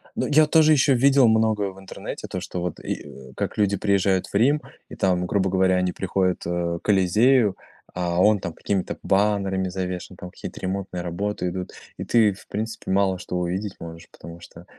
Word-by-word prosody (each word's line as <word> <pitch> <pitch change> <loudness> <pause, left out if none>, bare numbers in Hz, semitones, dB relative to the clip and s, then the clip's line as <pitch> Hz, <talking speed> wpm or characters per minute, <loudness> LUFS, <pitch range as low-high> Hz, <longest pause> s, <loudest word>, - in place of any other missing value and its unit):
Ну, - - -1
я 155 +1 +5
тоже 155 0 +5
ещё 140 -1 +4
видел 135 0 +5
многое 110 -3 +2
в 95 - -15
интернете, 95 - -8
то, - - -4
что 90 - -5
вот, 90 -2 -4
и, - - -3
э, 65 -1 -12
как - - -3
люди 100 -1 +2
приезжают 95 -1 +1
в - - -17
Рим, 140 +8 +3 0.3
и - - -9
там, 90 -2 +1
грубо 95 0 +1
говоря, 95 0 +2
они 90 0 +1
приходят, 95 -1 -1
а, 85 0 -2
к - - -31
Колизею, 105 +3 +3 0.4
а 90 -1 -1
он 105 +1 +4
там 85 -3 -5
какими-то 95 +1 -2
баннерами 95 -2 +1
завешен, 90 0 -5
там 90 0 -9
какие-то - - -9
ремонтные 95 -1 -4
работы 90 +2 -3
идут, 90 +1 -5 0.3
и - - -4
ты, 110 -4 +3
в 95 - -16
принципе, 110 0 -4
мало 95 -1 +2
что 90 - -6
увидеть 95 +3 -3
можешь, 85 0 -10
потому 85 0 -11
что 85 0 -14
95 Hz, 195 wpm, -23 LUFS, 90-105 Hz, 0.4 s, я